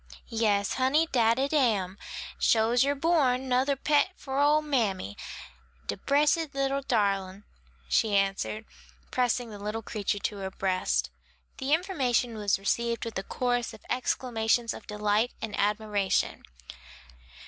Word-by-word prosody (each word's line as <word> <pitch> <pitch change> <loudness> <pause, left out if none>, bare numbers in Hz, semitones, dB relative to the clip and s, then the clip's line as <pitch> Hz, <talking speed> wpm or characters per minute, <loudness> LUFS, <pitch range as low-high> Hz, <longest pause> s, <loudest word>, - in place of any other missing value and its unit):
"Yes, 210 -3 +1
honey, 265 +5 +3
dat 230 -2 +3
it 275 +3 0
am; 205 -9 +1 0.4
sho's 230 +2 +4
yer 285 +1 +1
born, 270 -5 +2
'nother 260 +2 +2
pet 295 +6 +2
for 270 0 -3
ole 300 +2 +4
mammy, 210 - -1 0.7
de 100 - -2
bressed 295 - +1
little 275 0 0
darlin'," 200 -5 0 0.4
she 210 - +2
answered, 195 +2 -1 0.5
pressing 245 -2 0
the 205 - -9
little 210 +2 -4
creature 205 -2 -2
to 205 +1 -3
her 190 -1 -4
breast. 185 - 0 0.5
The 265 +2 -2
information 260 - 0
was 205 -2 +1
received 235 +4 -1
with 230 - -6
a - - -2
chorus 245 +2 -1
of - - -18
exclamations 240 -2 0
of - - -11
delight 210 +2 0
and 220 -2 -4
admiration. 205 -1 0
230 Hz, 135 wpm, -28 LUFS, 205-270 Hz, 0.7 s, sho's